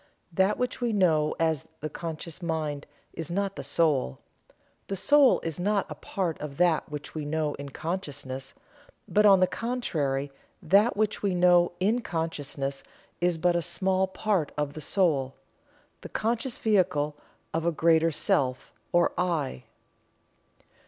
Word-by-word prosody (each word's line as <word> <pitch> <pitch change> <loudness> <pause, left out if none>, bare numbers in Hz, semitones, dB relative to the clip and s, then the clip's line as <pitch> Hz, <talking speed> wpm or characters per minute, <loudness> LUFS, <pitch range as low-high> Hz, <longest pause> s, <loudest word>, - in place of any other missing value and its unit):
That 190 +4 +2
which 250 0 -2
we 240 -2 0
know 160 -6 +2
as 160 -3 0
the 155 - -2
"conscious 165 +2 -6
mind" 155 -4 -3 0.3
is 165 -1 -5
not 195 +2 -1
the - - -5
Soul. 140 - +1 0.7
The 195 - -2
Soul 285 +7 +5
is 165 0 -4
not 200 +2 +1
a - - -2
part 180 -5 -3
of 145 -2 -6
that 175 -3 +2
which 150 0 -7
we 155 - -4
know 150 0 -1
in 140 0 -6
consciousness, 145 -5 -5 0.5
but, 210 +1 +4
on 195 -2 +6
the - - +7
contrary, 155 - -2 0.3
that 205 +4 +3
which 215 0 0
we 195 -3 0
know 175 -1 +4
in 215 +6 +2
consciousness 145 -6 -3 0.4
is 175 -1 +1
but 175 +1 +2
a 170 - +2
small 185 +2 +1
part 190 -5 -1
of 145 -1 -1
the 155 - -7
Soul 145 -6 +1 0.7
the - - -9
conscious 235 +3 -1
vehicle 180 -9 +1 0.4
of 160 - 0
a 170 - +2
greater 165 +1 +3
Self, 130 -4 0 0.2
or 175 0 +3
"I." 150 - -1
170 Hz, 150 wpm, -27 LUFS, 150-190 Hz, 0.7 s, the